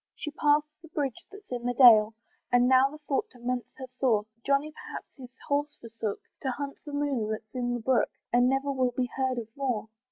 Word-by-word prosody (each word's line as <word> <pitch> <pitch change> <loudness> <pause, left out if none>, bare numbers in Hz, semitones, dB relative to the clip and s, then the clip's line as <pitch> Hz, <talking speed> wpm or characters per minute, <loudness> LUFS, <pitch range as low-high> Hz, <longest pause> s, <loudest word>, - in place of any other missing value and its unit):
She's 300 - -6
past 295 +1 +3 0.2
the 330 - -13
bridge 285 -5 -3
that's 400 -5 -14
in 245 -1 -2
the 245 - -1
dale, 225 -3 +8 0.4
And 245 0 +5
now 260 +1 +5
the 300 - -10
thought 275 - 0
torments 245 0 -3
her 265 - -6
sore, 220 -6 +2 0.2
Johnny 280 +2 +1
perhaps - - -8
his 255 -3 -11 0.2
horse 290 +1 0
forsook, 225 -3 -4 0.2
To 265 - -1
hunt 280 +2 -4
the - - -5
moon 280 -7 -1
that's 215 0 -5
in 245 -1 -1
the 240 - -4
brook, 255 +1 +2 0.2
And 245 +1 +5
never 270 +1 0
will 255 -2 0
be 250 -1 0
heard 260 -1 0
of 225 -1 -6
more. 250 -6 -2
255 Hz, 210 wpm, -28 LUFS, 240-280 Hz, 0.4 s, dale